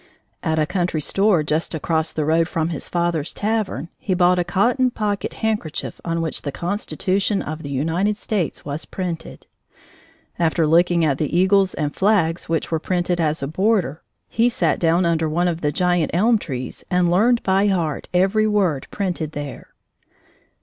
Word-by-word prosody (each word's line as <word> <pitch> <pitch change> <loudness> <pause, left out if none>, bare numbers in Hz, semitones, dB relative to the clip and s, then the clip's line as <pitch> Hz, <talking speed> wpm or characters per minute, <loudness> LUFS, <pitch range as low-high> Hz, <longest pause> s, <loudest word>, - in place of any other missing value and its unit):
At 160 0 0
a 155 - +3
country 175 -1 -1
store, 195 +2 +2
just 155 +2 -1
across 160 0 -1
the 155 - -2
road 165 +2 +2
from 165 -2 -1
his 160 - -5
father's 170 -3 -1
tavern, 215 -5 -2
he 190 - -1
bought 180 0 +4
a - - +2
cotton 235 +9 +2
pocket 210 -4 -3
handkerchief 210 -8 -3
on 165 -1 -1
which 160 - -4
the 140 - -4
Constitution 195 +4 -1
of 155 +1 -5
the 145 - -7
United 165 +9 0
States 205 -6 -2
was 145 +2 -4
printed. 175 -3 -6 0.9
After 165 -1 +2
looking 170 +1 +3
at 140 -3 0
the 155 +2 0
eagles 190 +1 +3
and 150 -1 -2
flags 180 -6 +1
which 165 0 -1
were 160 - +1
printed 175 0 -1
as 155 -2 0
a - - -1
border, 185 -2 0 0.3
he 230 +2 +2
sat 175 -9 0
down 170 +1 +2
under 165 -1 +1
one 175 +3 +1
of 170 -1 -2
the 150 - +1
giant 175 0 +1
elm 220 +5 +4
trees 130 -8 -6
and 180 -1 +2
learned 230 +6 +3
by 195 +2 +3
heart 170 -7 -1
every 195 +4 +2
word 185 -10 +1
printed 175 -6 -3
there. 145 -1 -6
175 Hz, 170 wpm, -21 LUFS, 160-195 Hz, 0.9 s, bought